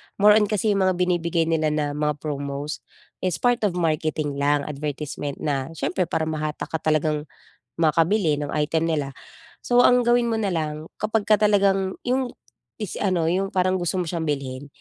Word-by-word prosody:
More 210 +1 +6
on 210 - +2
kasi 210 0 +1
yung 195 -2 +2
mga 185 - +2
binibigay 175 -2 +1
nila 155 -1 +2
na 150 -1 0
mga 150 0 -1
promos 145 0 -4 0.4
is 185 -3 -1
part 245 -1 +2
of 180 - -4
marketing 155 -3 -1
lang, 145 0 +2
advertisement 145 -1 -4
na 135 -3 -1
siyempre 180 +2 -1
para 160 - -1
mahatak 155 -1 -3
ka 160 - -1
talagang 155 -1 0 0.5
makabili 165 +1 +3
ng 145 0 -4
item 155 +2 0
nila. 140 -3 -2 0.5
So, 245 0 +3
ang 250 0 +5
gawin 240 0 +3
mo 225 - 0
na 205 -3 0
lang 155 -1 -3
kapagka 215 0 +2
talagang 195 -2 +3
yung 255 0 0 0.5
is 200 - -4
ano 175 -5 +1
yung 195 +2 0
parang 185 0 +2
gusto 175 +1 -2
mo 180 -1 0
siyang 165 -2 -2
bilhin 140 -1 -3
160 Hz, 175 wpm, -24 LUFS, 150-195 Hz, 0.5 s, More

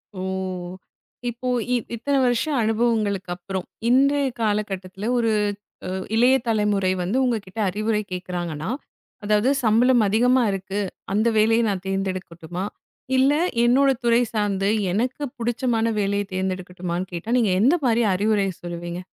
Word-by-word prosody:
ஓ. - - -6 1.1
இப்போ 240 +2 -6 0.3
இ - - +4 0.2
இத்தன 275 +5 -1
வருஷம் 255 +4 +1
அனுபவங்களுக்கு 215 -4 0
அப்புறம், 185 +1 -5 0.2
இன்றைய 275 +2 +4
கால 210 -1 +2
கட்டத்துல 190 +3 -5
ஒரு 230 -2 +2 0.6
அ - - -3 0.3
இளைய 250 +3 +5
தலைமுறை 210 -4 +2
வந்து 195 +9 -1
உங்ககிட்ட 220 -4 -2
அறிவுரை 215 +2 0
கேக்குறாங்கன்னா, 175 -2 -4 0.5
அதாவது 210 +4 +2
சம்பளம் 235 +2 +4
அதிகமா 245 +4 +3
இருக்கு, 195 +1 -3 0.3
அந்த 215 +3 +2
வேலைய 225 +2 +4
நான் 190 -2 -2
தேர்ந்தெடுக்குட்டுமா? 185 -2 -3 0.5
இல்ல 270 +2 +4 0.3
என்னோட 270 +3 +4
துறை 235 +1 +4
சார்ந்து 200 -2 0 0.2
எனக்குப் 250 +6 -2
புடிச்சமான 235 -1 0
வேலைய 200 0 0
தேர்ந்தெடுக்குட்டுமான்னு 185 -1 -3
கேட்டா, 175 +6 -5
நீங்க 210 -5 +2
எந்த 275 +9 +5
மாரி 235 0 +3
அறிவுரை 205 0 +2 0.2
சொல்லுவீங்க? 175 +1 -5
210 Hz, 125 wpm, -23 LUFS, 185-240 Hz, 1.1 s, இளைய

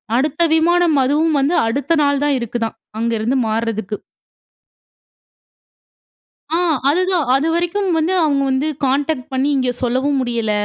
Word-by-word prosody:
அடுத்த 295 +5 0
விமானம், 340 0 +3
அதுவும் 300 +4 +1
வந்து 285 +6 +1
அடுத்த 280 +8 0
நாள் 285 -1 +1
தான் 290 -1 +2
இருக்குதாம். 230 -1 -4 0.2
அங்க 230 +1 -1
இருந்து 225 +5 -1
மாறுறதுக்கு. 220 -2 -2 2.6
ஆ - - +1 0.3
அதுதான். 360 0 +1
அதுவரைக்கும் 340 +7 0
வந்து 320 +4 +1
அவங்க 285 -3 +1
வந்து 265 +3 0 0.2
கான்டேக்ட் 275 0 -1
பண்ணி 265 +2 +1
இங்க 255 -1 0
சொல்லவும் 260 +3 0
முடியல. 235 -3 -1
280 Hz, 125 wpm, -18 LUFS, 240-320 Hz, 2.6 s, விமானம்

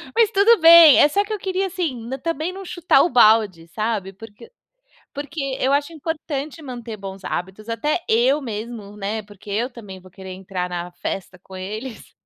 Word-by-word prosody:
Mas 455 -2 +4
tudo 420 +2 +5
bem, 330 -3 +9
é - - +7
só 400 +7 +1
que 430 +1 -6
eu - - -2
queria, 380 0 -2
assim, 270 -11 -4
também 330 +1 -2
não 390 0 -8
chutar 340 -6 +2
o - - +1
balde, 215 -8 +4
sabe? 210 0 -3
Porque 225 - -14 0.6
porque 290 +2 -6 0.2
eu 265 +2 +2
acho 285 +3 0
importante 310 -1 -5
manter 240 -5 -7
bons 195 -1 -9
hábitos, 190 +5 -5
até 295 +9 -1
eu 255 +6 +3
mesmo, 215 -2 -7
né, 210 +2 -3
porque 205 0 -17
eu 230 +6 -1
também 205 -6 -11
vou 185 0 -17
querer 190 0 -11
entrar 185 -1 -5
na 175 0 -5
festa 180 +1 -6
com 190 - -15
eles. 215 +6 -7
230 Hz, 180 wpm, -21 LUFS, 200-310 Hz, 0.6 s, bem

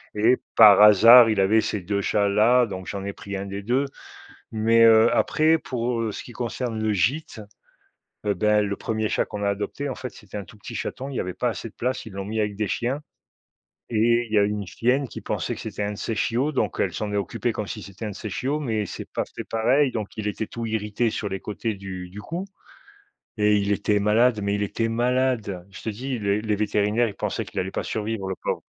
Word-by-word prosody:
et 115 +4 +4 0.2
par 105 -3 +9
hasard, 115 +3 +9
il 110 -2 +1
avait 105 +3 +4
ces 105 - -2
2 100 +3 -1
chats-là, 105 +5 +3
donc 95 -4 -7
j'en 100 -1 -5
ai 100 - -4
pris 100 0 -6
1 95 - -4
des 100 0 -5
2. 125 +7 +1 0.7
Mais 115 +1 +4
heu, 115 0 +6
après, 160 +1 +3
pour, 120 -4 -2
heu, 110 -2 -2
ce - - -6
qui - - -12
concerne 120 -1 -4
le 110 0 +1
gîte, 115 - -1 0.9
heu, 105 - +2
ben 105 0 +3
le 100 0 -3
1er 110 -1 -2
chat - - +1
qu'on 105 0 -6
a 100 - +2
adopté, 105 +8 -3
en 130 - -4
fait, 125 -2 -6
c'était 105 0 -10
un 100 - -6
tout 90 - -16
petit 100 - -9
chaton. 135 +2 -4
Il 140 - -7
y - - 0
avait 90 - -3
pas 125 - -1
assez 115 - -5
de 110 - -14
place, 125 +1 -3
ils 110 - -10
l'ont 100 0 -4
mis 110 +3 -3
avec 105 -1 -1
des 105 -1 -2
chiens 130 +5 -1 0.9
et 115 +2 +3
il - - -10
y 110 - +4
a 100 - +5
une 105 0 -2
chienne 130 +6 0
qui - - -8
pensait - - -3
que - - -9
c'était - - -5
un 100 0 -1
de 105 - -8
ses 115 - -2
chiots, 125 +7 0
donc 135 - -1
elle - - 0
s'en 105 -2 -3
est - - -1
occupée 115 +3 -1
comme 105 -1 -4
si 105 +1 -6
c'était 100 +3 -9
un - - -3
de - - -8
ses 105 +3 -6
chiots, 140 +9 -2
mais 110 -7 -1
c'est - - -7
pas - - -1
fait - - -3
pareil, 125 +5 +2
donc 110 -4 -5
il 105 -1 -2
était 105 +1 -3
tout 115 +2 -6
irrité 110 +1 -1
sur 105 - -3
les 95 -1 -4
côtés 110 +1 -3
du 95 -2 -7
du 100 +3 -9
cou 175 - -5 0.9
et 105 0 +4
il 100 0 0
était 105 +1 +1
malade, 110 +3 +3
mais 100 0 0
il 105 - -1
était 115 +3 -1
malade. 120 -5 0
Je 100 - -11
te - - -3
dis 125 +5 -4
le 100 0 +1
les 105 -1 -1
vétérinaires, 105 +2 +1
ils - - -8
pensaient - - -2
qu'il - - -5
allait - - -2
pas - - -3
survivre 110 -2 -3
le 95 - -2
pauvre. - - -2
110 Hz, 245 wpm, -24 LUFS, 100-120 Hz, 0.9 s, par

